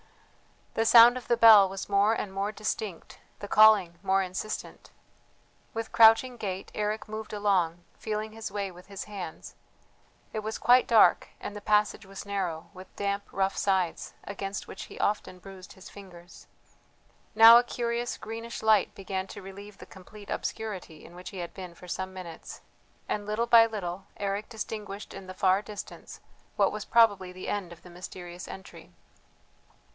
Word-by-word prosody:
The 225 - 0
sound 235 +1 +8
of 255 - -7
the 235 - +2
bell 215 -4 +8
was 195 0 -6
more 200 +2 +3
and 200 -3 -4
more 200 +2 -2
distinct, 215 -4 -5 0.2
the 205 - -7
calling 200 -6 +5
more 195 0 +2
insistent. 185 +4 -6 0.9
With 225 0 -4
crouching 230 +3 +5
gait 195 -3 -5
Eric 215 +1 -3
moved 215 0 -7
along, 185 -5 0 0.2
feeling 215 0 -4
his 220 -1 -7
way 200 -1 -3
with 180 +1 -15
his 200 -1 -7
hands; 185 - -8 0.8
it - - -2
was 215 +1 -4
quite 250 +1 +4
dark, 225 -2 +5
and 205 - -7
the 205 - -7
passage 210 0 +1
was 195 +1 -9
narrow, 185 -5 -4
with 185 0 -13
damp 200 0 -2
rough 195 0 0
sides, 190 -4 -1
against 200 -1 -6
which - - -8
he - - -12
often 205 -3 -1
bruised 185 0 -12
his 190 - -13
fingers. 180 -3 -14 0.9
Now 225 +1 +10
a - - 0
curious 240 0 -3
greenish 230 +1 -7
light 215 -3 +3
began 190 -1 -4
to 200 - -10
relieve 200 +2 -11
the - - -12
complete 205 +2 -13
obscurity 190 -8 -5
in 170 - -14
which 180 +1 -9
he 195 - -8
had 175 -1 -6
been 180 -3 -9
for 180 +1 -13
some 190 +1 -4
minutes, 175 -3 -9 0.5
and 205 -1 -2
little 215 +3 0
by 230 -1 +7
little 190 -4 -5
Eric 200 +1 -3
distinguished 210 -2 -7
in 195 -1 -10
the 185 - -9
far 190 +1 +2
distance 210 0 -10 0.3
what - - +2
was - - -6
probably 205 -6 +3
the 185 - -7
end 195 -4 -3
of 170 - -18
the 180 - -13
mysterious 175 0 -9
entry. 190 - -11
200 Hz, 170 wpm, -28 LUFS, 185-215 Hz, 0.9 s, Now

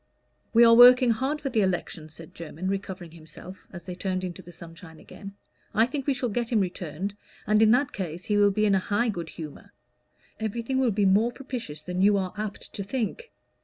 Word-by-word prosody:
"We 235 +1 +6
are 230 - +7
working 245 +1 +8
hard 270 +7 -2
for 275 - -2
the 230 - +1
election," 175 -4 -2
said 160 +1 -13
Jermyn, 165 +2 -7
recovering 190 -3 -4
himself, 165 +3 -13
as 175 -2 -9
they 180 +1 -7
turned 185 0 -3
into 180 -2 -6
the 175 - -13
sunshine 165 -1 -13
again. 200 0 -11 0.4
"I 225 - +5
think 270 +2 -5
we 280 - +2
shall 255 -1 -2
get 235 +2 -2
him 225 - +3
returned, 180 0 -3 0.3
and 215 0 +3
in 220 - +6
that 255 +4 +3
case 175 -2 -5
he 210 - -1
will 205 0 +5
be 210 +2 +1
in 205 - +3
high 205 +5 +1
good 170 -6 -4
humor. 155 -3 -10 0.7
Everything 230 +4 -2
will 260 -2 +2
be 205 -1 +1
more 205 +5 +3
propitious 240 - -7
than 180 +2 -3
you 200 +1 +4
are 185 -2 -3
apt 210 -1 -6
to - - -5
think. 260 - -4
200 Hz, 205 wpm, -26 LUFS, 180-235 Hz, 0.7 s, working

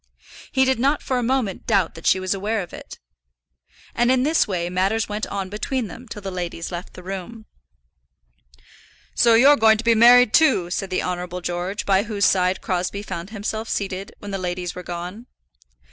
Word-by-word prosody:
He 265 0 +3
did 260 -2 +1
not 280 +4 +1
for 255 -1 -1
a - - -1
moment 245 -5 -1
doubt 195 -6 +2
that 165 - -6
she 190 - +4
was 185 +1 -1
aware 205 +1 -2
of 175 - -13
it. - - -10 1.0
And 240 +1 +2
in 255 -1 +2
this 310 0 +2
way 175 -4 -2
matters 195 +5 0
went 210 +1 -3
on 195 -1 -4
between 215 +3 -3
them 250 +2 -11
till 210 -3 -9
the 195 - -4
ladies 175 -2 -5
left 175 +1 -7
the 180 - -11
room. 195 +4 -7 1.7
"So 235 -1 +4
you're 275 +5 +7
going 220 -3 +5
to 225 - -5
be 230 0 +4
married, 240 +1 +6
too," 255 - +3
said 195 +1 -2
the 185 - -1
Honourable 180 0 -4
George, 175 +4 -3
by 195 -1 +3
whose 205 -3 -1
side 185 0 +2
Crosbie 185 +2 -2
found 190 -2 -6
himself 220 +1 -4
seated 195 -1 -4
when 205 - -8
the 195 - -3
ladies 180 -1 -3
were 180 - -7
gone. 180 +7 -7
200 Hz, 190 wpm, -22 LUFS, 180-230 Hz, 1.7 s, you're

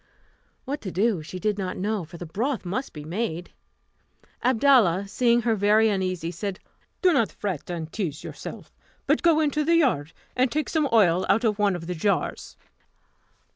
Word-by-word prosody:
What 285 +3 -4
to 190 - -5
do 200 -1 +1
she 170 +4 -8
did 210 +2 -1
not 185 -2 -3
know, 205 0 -1
for 170 +2 -11
the 175 - -7
broth 230 - -2
must 210 +10 -3
be 150 - -9
made. 175 -1 -3 0.9
Abdalla, 230 -7 +4
seeing 235 +2 +2
her 230 -1 +2
very 215 +2 +4
uneasy, 185 -4 -2
said, 190 +2 -5 0.4
"Do 365 -2 +5
not 230 -7 +2
fret 185 -7 -5
and 165 -2 -5
tease 165 -8 -3
yourself, - - -9 0.3
but - - +2
go 330 -2 +4
into 300 0 +1
the 335 +3 +3
yard, 225 - +2 0.2
and 255 -1 +2
take 305 0 -1
some 310 -4 +1
oil 185 -5 +4
out 225 +4 +3
of 215 -2 +1
one 205 -2 +2
of 170 -1 -6
the 180 - -3
jars." 200 +4 -2
205 Hz, 175 wpm, -25 LUFS, 180-245 Hz, 0.9 s, Do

